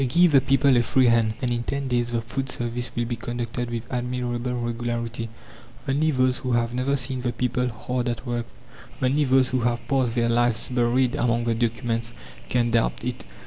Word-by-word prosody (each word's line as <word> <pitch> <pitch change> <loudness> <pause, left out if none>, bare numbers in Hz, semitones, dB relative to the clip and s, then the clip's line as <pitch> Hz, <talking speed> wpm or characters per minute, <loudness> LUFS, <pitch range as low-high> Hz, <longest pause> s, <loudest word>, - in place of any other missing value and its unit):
Give 170 +6 +4
the 135 -2 +6
people 135 0 +3
a - - +5
free 130 +2 +3
hand, 115 -2 +3
and 125 - +1
in 120 0 0
ten 140 +3 -3
days 120 -1 0
the 115 -1 0
food 130 +4 -4
service 120 0 -2
will 120 - 0
be 120 0 -2
conducted 120 +1 -4
with 120 -1 -4
admirable 125 0 -2
regularity. 120 -1 -3 0.6
Only 145 +4 +2
those 130 -2 +2
who 130 -2 -2
have 120 0 +1
never 130 +3 +1
seen 130 -1 -1
the 120 -1 -1
people 125 0 0
hard 125 +2 -2
at 120 +2 -4
work, 120 -2 -2 0.5
only 140 +3 +2
those 130 -1 +4
who 130 - 0
have 120 0 -1
passed 130 -5 +1
their 120 -1 +2
lives 120 0 +1
buried 125 +1 +2
among 120 -4 +1
the 115 -1 +1
documents, 115 0 -1 0.4
can 120 -1 +1
doubt 115 0 +1
it. 125 0 -4
120 Hz, 195 wpm, -24 LUFS, 120-130 Hz, 0.6 s, the